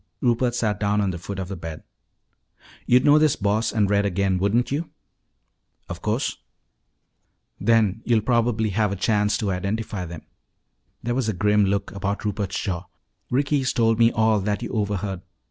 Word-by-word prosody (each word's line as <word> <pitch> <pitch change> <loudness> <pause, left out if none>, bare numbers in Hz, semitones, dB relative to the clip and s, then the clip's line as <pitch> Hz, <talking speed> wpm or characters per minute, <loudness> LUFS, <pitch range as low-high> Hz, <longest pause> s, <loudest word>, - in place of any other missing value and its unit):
Rupert 120 -1 +1
sat 105 -4 0
down 105 0 +1
on 100 -2 +1
the 85 - -6
foot 100 +3 -6
of 95 -2 -4
the 100 - -5
bed. 80 -2 -8 1.0
"You'd 125 +1 +4
know 150 +1 +6
this 155 -2 +3
Boss 105 +3 0
and 105 -3 +2
Red 100 +1 +2
again, 95 -1 0
wouldn't 110 +7 +1
you?" 155 +4 -2 1.0
"Of - - -7
course." - - -1 1.2
"Then 110 -1 +2
you'll 115 -2 +2
probably 115 -1 +1
have 105 +1 +1
a - - -2
chance 105 +2 +1
to 105 -5 -1
identify 100 +1 -3
them." 85 -1 -9 0.8
There 120 - -1
was 125 -3 0
a - - 0
grim 105 +2 +3
look 100 0 -1
about 100 +1 -3
Rupert's 100 -2 -2
jaw. 90 -3 -3 0.4
"Ricky's 140 0 +1
told 115 -1 +2
me 115 0 +5
all 110 -1 +2
that 105 +3 -2
you - - -5
overheard. 100 -3 -2
105 Hz, 170 wpm, -23 LUFS, 100-115 Hz, 1.2 s, know